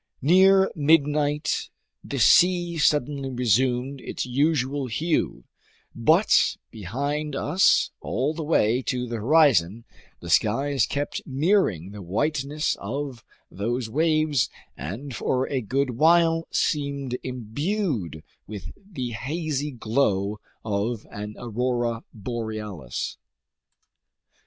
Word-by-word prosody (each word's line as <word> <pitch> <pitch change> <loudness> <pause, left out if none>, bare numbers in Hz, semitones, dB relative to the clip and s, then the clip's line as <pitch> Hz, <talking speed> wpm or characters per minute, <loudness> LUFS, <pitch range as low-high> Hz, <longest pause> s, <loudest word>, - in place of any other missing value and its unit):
Near 190 +5 +5
midnight 150 -1 +2 0.3
the - - -5
sea 175 -2 +4
suddenly 145 -2 +1
resumed 125 +2 0
its - - -4
usual 140 0 0
hue, 155 +8 -1 0.5
but - - +3
behind 140 - -3
us 165 +7 +3
all 135 +7 -1
the 160 - -5
way 125 -6 +2
to 125 -1 -2
the 115 0 -4
horizon, 115 - +3 0.3
the 85 - -6
skies 135 +9 +2
kept 145 +1 -3
mirroring 135 - +1
the 105 0 -9
whiteness 145 - -1
of 130 +2 -5 0.3
those 115 +4 -3
waves 155 -2 +2 0.3
and 115 - -6
for 130 +3 0
a 135 -2 -1
good 130 +4 -1
while 165 +4 +3
seemed 140 -3 -1
imbued 125 - -3 0.2
with 105 -3 -7
the 170 -12 -6
hazy 150 +4 -3
glow 110 -5 0 0.3
of 105 +2 -2
an 105 +1 -6
aurora 120 0 -2
borealis. 110 -4 -5
130 Hz, 105 wpm, -25 LUFS, 115-150 Hz, 0.5 s, Near